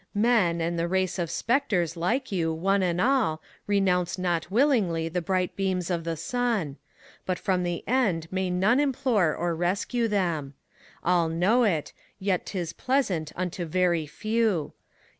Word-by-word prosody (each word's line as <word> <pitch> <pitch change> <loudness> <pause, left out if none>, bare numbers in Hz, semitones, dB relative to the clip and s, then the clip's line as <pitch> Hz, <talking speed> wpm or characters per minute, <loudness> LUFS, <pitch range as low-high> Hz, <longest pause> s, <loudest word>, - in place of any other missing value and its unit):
Men, 205 -6 +3
and 170 +1 -1
the 170 - 0
race 190 +1 0
of 170 -2 -1
spectres 210 - 0
like 225 +11 -1
you, 165 -4 0
one 195 +5 +1
and 175 -2 0
all. 240 -10 +2 0.3
Renounce 190 -3 +1
not 175 -2 -1
willingly 200 - +2
the 180 +2 -2
bright 185 0 -1
beams 185 -2 -1
of 170 -2 -2
the 165 -1 -2
sun; 230 - -1 0.5
But 185 -1 -2
from 185 -3 0
the 175 -1 -3
end 200 -10 +1
may 190 0 -1
none 195 +8 +3
implore 245 - +1
or 175 0 -1
rescue 195 +7 0
them. 170 -9 -1 0.5
All 170 -2 +2
know 195 +9 +3
it, 165 -8 -1 0.2
yet 190 -2 -1
't 195 - -5
is 170 -1 -4
pleasant 210 - 0
unto 180 0 -3
very 170 -1 +1
few. 215 -1 -1
180 Hz, 160 wpm, -26 LUFS, 170-215 Hz, 0.5 s, Men